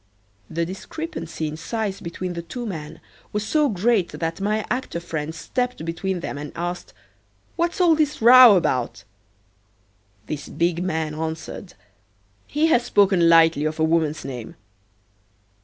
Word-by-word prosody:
The 165 +1 -1
discrepancy 185 - -5
in 150 +1 -6
size 200 +3 -3
between 175 +2 -5
the 170 - -4
two 240 +8 -7
men 160 -6 -6 0.3
was 210 0 -2
so 300 +3 +2
great 205 -1 +1
that 165 +2 -3
my 210 +1 0
actor 250 -8 -3
friend 160 -2 -5
stepped 250 -1 -3
between 175 +2 -3
them 145 - -5
and 150 0 -7
asked, 175 +1 -4 0.6
"What's 340 +1 -1
all 350 -3 +5
this 300 -2 0
row 245 -1 +9
about?" 130 - -1 1.2
The 150 - -4 0.2
big 170 +1 +1
man 160 -4 -2
answered: 160 +4 -6 0.7
"He 300 +2 +1
has 245 -7 +3
spoken 195 -7 +4
lightly 165 -2 +5
of 155 +1 -2
a - - +2
woman's 160 -3 +1
name." 125 -4 -7
175 Hz, 140 wpm, -23 LUFS, 160-225 Hz, 1.2 s, row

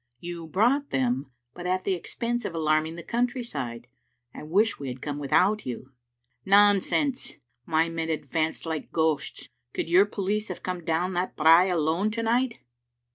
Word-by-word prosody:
" - - -53
" 120 - -50
You 170 -2 -6
brought 245 - +2
them, 130 +1 0 0.2
but 175 +3 -6
at 185 +1 0
the 195 - +1
expense 235 +7 -3
of 180 - -4
alarming 155 0 +1
the 170 - -8
country 245 +2 -1
side. 120 - -5 0.5
I - - -9
wish 200 +9 +1
we 140 - -5
had 125 0 -5
come 145 +1 -4
without 185 +9 +2
you." 130 +1 -6 0.3
" 120 - -56 0.2
"Nonsense! 205 +7 +3 0.3
My 160 0 +2
men 165 -1 -3
advanced 155 +1 -2
like 160 -2 -4
ghosts. 160 -2 -1 0.2
Could - - -2
your 185 +4 +6
police 205 +1 -2
have 180 - -7
come 180 -2 -4
down 170 +3 0
that 180 +1 -2
brae 165 +4 +6
alone 170 +4 +1
to 230 0 -2
night?" 235 +1 +1
175 Hz, 180 wpm, -26 LUFS, 155-205 Hz, 0.5 s, your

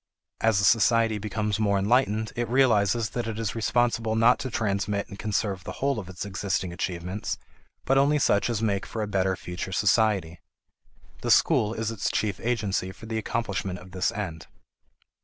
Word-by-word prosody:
As 110 -3 +3
a - - 0
society 115 0 +4
becomes 105 0 -2
more 100 -2 +2
enlightened, 110 +1 +1
it 120 -1 -2
realizes 115 -4 +3
that 120 -2 -3
it 110 -1 -4
is 110 -3 -2
responsible 115 -1 +1
not 115 +2 +5
to 130 - -3
transmit 100 -3 -1
and 100 - -10
conserve 100 -3 -1
the - - -6
whole 140 -4 -1
of 95 -3 -8
its 95 +2 -6
existing 95 -2 -2
achievements, 90 +3 -3 0.5
but 135 +1 +4
only 145 +2 +3
such 105 -6 +2
as 115 -2 -1
make 100 -3 0
for 110 - -3
a - - -3
better 95 -2 +1
future 90 +1 -6
society. 95 -4 +2 0.8
The - - -3
school 110 +1 +4
is 115 0 -2
its 110 -3 -2
chief 105 -3 -1
agency 105 -6 -1
for 110 - -13
the 110 0 -2
accomplishment 100 -5 -2
of 90 +1 -13
this 95 0 0
end. 85 -6 -5
105 Hz, 175 wpm, -26 LUFS, 95-115 Hz, 0.8 s, not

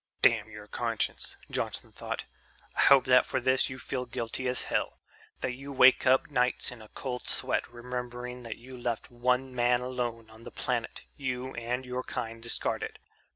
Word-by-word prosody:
"Damn 115 -4 +5
your 105 -1 -9
conscience," - - -1
Johnson - - -2
thought. - - -5 0.5
"I - - -5
hope 135 -2 +7
that 125 0 +7
for 130 - -1
this 130 +2 +3
you 130 - -6
feel 130 -1 -3
guilty 120 +1 -3
as 125 - +1
hell, - - -1 0.4
that - - 0
you 140 +3 -8
wake 130 0 +6
up 130 +3 +4
nights 125 -3 +2
in 125 -2 -10
a 110 - -11
cold 125 +2 -5
sweat - - +1
remembering 125 0 -5
that 115 -2 -6
you 130 +2 -11
left 120 -2 -3
one 125 +2 +1
man 120 0 +3
alone 120 -3 -3
on 110 +1 -14
the - - -8
planet - - -2 0.2
you 130 -1 -3
and 120 +2 -2
your 125 0 -2
kind 115 -3 -4
discarded. 115 0 -2
125 Hz, 175 wpm, -30 LUFS, 120-130 Hz, 0.5 s, hope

